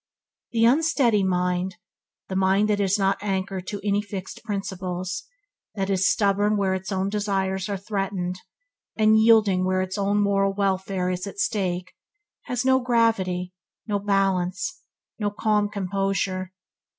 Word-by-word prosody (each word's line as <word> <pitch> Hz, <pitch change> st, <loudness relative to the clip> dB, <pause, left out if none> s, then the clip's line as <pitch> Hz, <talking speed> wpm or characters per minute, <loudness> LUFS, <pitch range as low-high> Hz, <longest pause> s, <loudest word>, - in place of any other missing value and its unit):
The 230 Hz, -1 st, +3 dB
unsteady 260 Hz, -5 st, +3 dB
mind, 180 Hz, 0 st, 0 dB, 0.5 s
the 190 Hz, -, -4 dB
mind 190 Hz, +2 st, +3 dB
that 205 Hz, -1 st, +1 dB
is 195 Hz, 0 st, +2 dB
not 195 Hz, -1 st, +1 dB
anchored 190 Hz, -2 st, -3 dB
to 205 Hz, -, -4 dB
any 200 Hz, 0 st, +2 dB
fixed 200 Hz, -3 st, -7 dB
principles, 190 Hz, -3 st, -4 dB, 0.5 s
that 195 Hz, -1 st, -1 dB
is 195 Hz, +2 st, +3 dB
stubborn 205 Hz, +1 st, +2 dB
where 195 Hz, -2 st, +1 dB
its 190 Hz, 0 st, -4 dB
own 190 Hz, 0 st, 0 dB
desires 195 Hz, -2 st, -1 dB
are 200 Hz, -, -1 dB
threatened, 190 Hz, -2 st, -3 dB, 0.5 s
and 220 Hz, 0 st, +5 dB
yielding 215 Hz, -5 st, +5 dB
where 185 Hz, 0 st, +1 dB
its 190 Hz, +2 st, -4 dB
own 200 Hz, +1 st, +1 dB
moral 195 Hz, -1 st, +2 dB
welfare 190 Hz, -2 st, 0 dB
is 180 Hz, +2 st, -3 dB
at 200 Hz, -, -8 dB
stake, 185 Hz, -3 st, -1 dB, 0.5 s
has 250 Hz, +1 st, -2 dB
no 260 Hz, 0 st, +5 dB
gravity, 220 Hz, -7 st, +1 dB, 0.3 s
no 205 Hz, -2 st, -1 dB
balance, 195 Hz, -, 0 dB, 0.4 s
no 205 Hz, -1 st, 0 dB
calm 210 Hz, 0 st, +1 dB
composure. 195 Hz, -1 st, -2 dB
195 Hz, 140 wpm, -24 LUFS, 185-210 Hz, 0.5 s, and